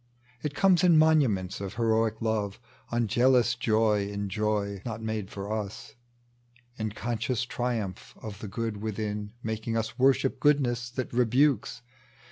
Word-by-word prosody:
It 145 +1 -3
comes 185 0 +4
in 175 -3 +6
moments 130 - +3
of 100 0 -5
heroic 110 -1 +1
love, 105 -3 -1 0.3
Unjealous 120 +1 +3
joy 110 -3 +2
in 100 -1 -4
joy 100 -1 -1
not 115 -2 -4
made 110 -3 -3
for 100 +2 -5
us 105 -2 -5 0.4
— 120 0 -34
In 110 -1 -2
conscious 120 +2 -2
triumph 120 -6 -3
of 105 -2 -8
the 105 - -6
good 110 +2 -3
within 105 -1 -4
Making 110 +1 -2
us 110 +3 -3
worship 135 0 +3
goodness 125 -5 +2
that 125 0 -5
rebukes. 125 0 +2
110 Hz, 140 wpm, -28 LUFS, 105-120 Hz, 0.4 s, in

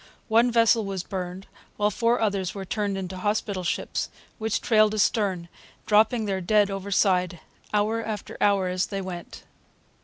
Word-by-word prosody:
One 230 +2 +4
vessel 230 -1 +4
was 195 -2 -4
burned, 185 0 -5 0.3
while 210 0 +2
four 235 +3 +1
others 195 -4 -1
were 195 -1 -5
turned 205 0 -2
into 185 -1 -5
hospital 205 -1 -1
ships, 170 - -2 0.3
which 220 0 0
trailed 215 -2 +3
astern, 200 -5 +1 0.4
dropping 220 +2 +3
their 195 -2 -2
dead 205 +2 +3
overside, 190 -3 +1 0.3
hour 215 +2 +1
after 215 -3 -5
hour, 200 -2 +3
as 180 0 -1
they 195 - -4
went. 180 -2 -7
200 Hz, 150 wpm, -25 LUFS, 185-215 Hz, 0.4 s, One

